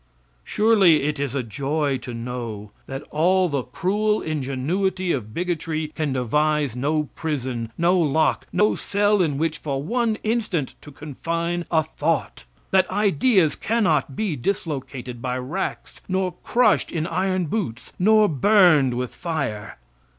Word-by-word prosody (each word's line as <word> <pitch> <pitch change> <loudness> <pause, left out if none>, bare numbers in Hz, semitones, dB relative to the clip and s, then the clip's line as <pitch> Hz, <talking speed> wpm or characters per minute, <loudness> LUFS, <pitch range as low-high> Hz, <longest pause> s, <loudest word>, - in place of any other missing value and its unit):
Surely 205 -8 +4
it 150 0 -1
is 140 -2 -2
a 135 - 0
joy 140 +5 -1
to 125 -1 -6
know 115 -3 -6 0.2
that 135 +2 -6
all 185 +4 +3
the 140 -4 -1
cruel 205 - 0
ingenuity 155 +6 -1
of 110 -8 -3
bigotry 160 0 -2
can 155 -2 -2
devise 145 +1 +1
no 150 +4 0
prison, 130 -7 -3
no 175 +2 +3
lock, 155 -1 +1
no 210 +1 +3
cell, 205 0 +1
in 150 -5 0
which 160 +1 -1
for 140 -2 -3
one 230 +4 0
instant 215 - -1
to 150 - -12
confine 165 +4 -3
a 160 -2 +3
thought; 155 0 -2 0.3
that 190 -1 +3
ideas 195 - +3
cannot 165 - 0
be 200 -4 -1
dislocated 130 -6 -4
by 125 0 -2
racks, 145 +10 -5
nor 185 -1 -1
crushed 235 -4 +2
in 160 -2 -2
iron 185 0 0
boots, 155 - -4
nor 215 +3 +5
burned 155 - +4
with 125 0 -3
fire. 140 - -4
155 Hz, 140 wpm, -23 LUFS, 135-185 Hz, 0.3 s, nor